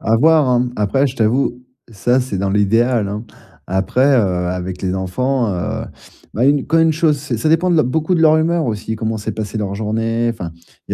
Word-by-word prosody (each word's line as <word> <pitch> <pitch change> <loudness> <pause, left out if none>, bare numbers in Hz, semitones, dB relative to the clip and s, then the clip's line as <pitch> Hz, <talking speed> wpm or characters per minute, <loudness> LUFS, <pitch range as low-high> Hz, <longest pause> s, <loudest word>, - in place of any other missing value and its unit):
À 110 - +2
voir, 155 +2 +4
hein, 125 -1 +3
m - - -11
après 105 +7 +1
je 130 - -6
t'avoue, 120 +2 0 0.3
ça 120 +4 +1
c'est 125 -7 -4
dans 95 +1 -1
l'idéal, 110 +2 +2
hein. 105 +3 -5 0.4
Après, 95 +8 +1
heu, 95 -10 +2
avec 90 0 -5
les 95 -1 -1
enfants, 120 +7 -1
heu, 90 - -3 0.5
bah, 120 - +1
une 140 -1 +2
quand 165 +1 +2
une 160 -1 +3
chose, 155 -2 +2
c'est 135 -5 -4
ça 155 - 0
dépend 165 +3 +2
de 170 - +3
l - - +5
beaucoup 160 +7 0
de - - 0
leur 155 -1 +6
humeur 165 -1 +1
aussi. 110 0 -3
Comment 110 0 -3
s'est 105 - -4
passé 110 0 -5
leur 100 -2 -3
journée? 115 +2 -1
Enfin, 90 -7 -6 0.4
il - - -4
115 Hz, 220 wpm, -18 LUFS, 105-140 Hz, 0.5 s, leur